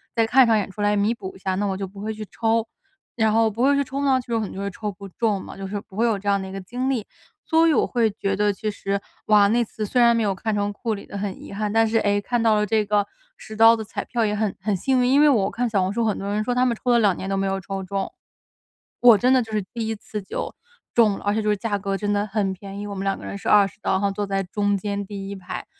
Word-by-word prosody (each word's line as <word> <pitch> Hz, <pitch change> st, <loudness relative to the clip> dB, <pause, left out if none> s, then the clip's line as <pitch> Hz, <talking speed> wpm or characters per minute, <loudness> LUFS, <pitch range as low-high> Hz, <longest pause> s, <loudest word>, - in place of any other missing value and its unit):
再 225 Hz, -, +3 dB
看 260 Hz, +4 st, +6 dB
一 -, -, +2 dB
场 225 Hz, -1 st, +4 dB
演 205 Hz, -, -2 dB
出 205 Hz, -, -7 dB
来 205 Hz, 0 st, +2 dB
弥 205 Hz, +3 st, +2 dB
补 190 Hz, -5 st, -8 dB
一 -, -, -14 dB
下， 190 Hz, 0 st, -2 dB
那 205 Hz, +2 st, 0 dB
我 190 Hz, -1 st, -2 dB
就 195 Hz, -1 st, -4 dB
不 195 Hz, +1 st, -11 dB
会 215 Hz, +1 st, -3 dB
去 215 Hz, 0 st, -6 dB
抽。 225 Hz, 0 st, 0 dB, 0.5 s
然 220 Hz, -2 st, +2 dB
后 225 Hz, 0 st, +3 dB
不 225 Hz, +3 st, -2 dB
会 280 Hz, +2 st, +5 dB
去 280 Hz, -, +2 dB
抽 275 Hz, +1 st, -3 dB
呢， 265 Hz, -2 st, +3 dB
就 240 Hz, -2 st, -6 dB
有 225 Hz, -, +1 dB
可 -, -, -2 dB
能 -, -, -8 dB
就 195 Hz, -, -7 dB
会 200 Hz, -, -2 dB
抽 210 Hz, +2 st, -5 dB
不 200 Hz, +1 st, -11 dB
中 205 Hz, +1 st, -1 dB
嘛， -, -, -10 dB
就 195 Hz, -, -7 dB
是 205 Hz, +2 st, -4 dB
不 195 Hz, -, -16 dB
会 225 Hz, -, +1 dB
有 220 Hz, -4 st, +1 dB
这 205 Hz, -, -9 dB
样 200 Hz, -1 st, +2 dB
的 -, -, -5 dB
一 -, -, -9 dB
个 195 Hz, -, -5 dB
经 245 Hz, +7 st, -3 dB
历。 240 Hz, -6 st, -1 dB, 0.4 s
所 325 Hz, 0 st, +4 dB
以 325 Hz, -, +4 dB
我 -, -, +2 dB
会 230 Hz, -3 st, +2 dB
觉 195 Hz, -1 st, -2 dB
得 205 Hz, +1 st, +2 dB
其 215 Hz, +2 st, -4 dB
实， 200 Hz, -1 st, -2 dB, 0.3 s
哇， 210 Hz, -1 st, +6 dB
那 235 Hz, +3 st, +2 dB
次 215 Hz, -1 st, -5 dB
虽 245 Hz, +4 st, +1 dB
然 235 Hz, 0 st, +6 dB
没 -, -, +1 dB
有 200 Hz, -3 st, 0 dB
看 220 Hz, +3 st, -2 dB
成 205 Hz, 0 st, -1 dB
库 225 Hz, +2 st, -3 dB
里 200 Hz, -, -9 dB
的 200 Hz, -, -7 dB
很 200 Hz, -1 st, -4 dB
遗 -, -, -10 dB
憾， 210 Hz, 0 st, -2 dB
但 225 Hz, +1 st, +3 dB
是， 225 Hz, -, +1 dB
诶， 205 Hz, -1 st, +1 dB
看 235 Hz, +3 st, -1 dB
到 220 Hz, -2 st, +4 dB
了 210 Hz, 0 st, +2 dB
这 215 Hz, +1 st, +1 dB
个 205 Hz, 0 st, +1 dB, 0.3 s
10 220 Hz, -, -10 dB
刀 225 Hz, +1 st, +7 dB
的 220 Hz, -1 st, -3 dB
彩 210 Hz, -, -5 dB
票 235 Hz, -2 st, -1 dB
也 210 Hz, 0 st, 0 dB
很 210 Hz, -2 st, -1 dB
很 200 Hz, +1 st, -1 dB
幸 255 Hz, +7 st, +1 dB
运。 245 Hz, -, +2 dB
因 280 Hz, +2 st, +5 dB
为 300 Hz, -, +6 dB
我 205 Hz, -8 st, +2 dB
看 245 Hz, +2 st, -2 dB
小 200 Hz, -4 st, +1 dB
红 185 Hz, +2 st, -1 dB
书 235 Hz, +2 st, 0 dB
很 215 Hz, -2 st, 0 dB
多 195 Hz, -, -5 dB
人 210 Hz, +1 st, 0 dB
说 245 Hz, -, -1 dB
他 250 Hz, +1 st, +2 dB
们 240 Hz, -, +1 dB
抽 250 Hz, -, +2 dB
了 240 Hz, -, +5 dB
2 200 Hz, -5 st, +3 dB
年 195 Hz, -, -5 dB
都 195 Hz, -, 0 dB
没 195 Hz, -, 0 dB
有 195 Hz, 0 st, -1 dB
抽 195 Hz, +1 st, -5 dB
中， 195 Hz, +1 st, -3 dB, 0.9 s
我 240 Hz, -3 st, +8 dB
真 250 Hz, +4 st, +2 dB
的 260 Hz, -, +5 dB
就 225 Hz, -, -7 dB
是 210 Hz, -, +1 dB
第 230 Hz, -2 st, -3 dB
一 225 Hz, -, -2 dB
次 210 Hz, 0 st, -7 dB
就 190 Hz, -, -5 dB, 0.4 s
中 215 Hz, -4 st, +4 dB
了， -, -, -11 dB
而 205 Hz, -, +1 dB
且 220 Hz, -, 0 dB
就 210 Hz, -, 0 dB
是 210 Hz, -, +3 dB
价 205 Hz, 0 st, -2 dB
格 195 Hz, 0 st, -2 dB
真 205 Hz, +1 st, -2 dB
的 205 Hz, +1 st, 0 dB
很 200 Hz, -1 st, -1 dB
便 195 Hz, +1 st, -9 dB
宜。 205 Hz, -, -5 dB
我 200 Hz, -, -5 dB
们 195 Hz, 0 st, -4 dB
两 195 Hz, -, 0 dB
个 -, -, -10 dB
人 200 Hz, -, -5 dB
是 -, -, -8 dB
20 200 Hz, 0 st, +4 dB
刀， -, -, -1 dB
然 190 Hz, -, +1 dB
后 200 Hz, -1 st, +1 dB
坐 205 Hz, +1 st, -3 dB
在 195 Hz, 0 st, -1 dB
中 205 Hz, +2 st, 0 dB
间 200 Hz, +1 st, -3 dB
第 195 Hz, -1 st, -7 dB
1 200 Hz, -, -5 dB
排， 185 Hz, 0 st, -7 dB
210 Hz, 335 characters per minute, -23 LUFS, 200-225 Hz, 0.9 s, 我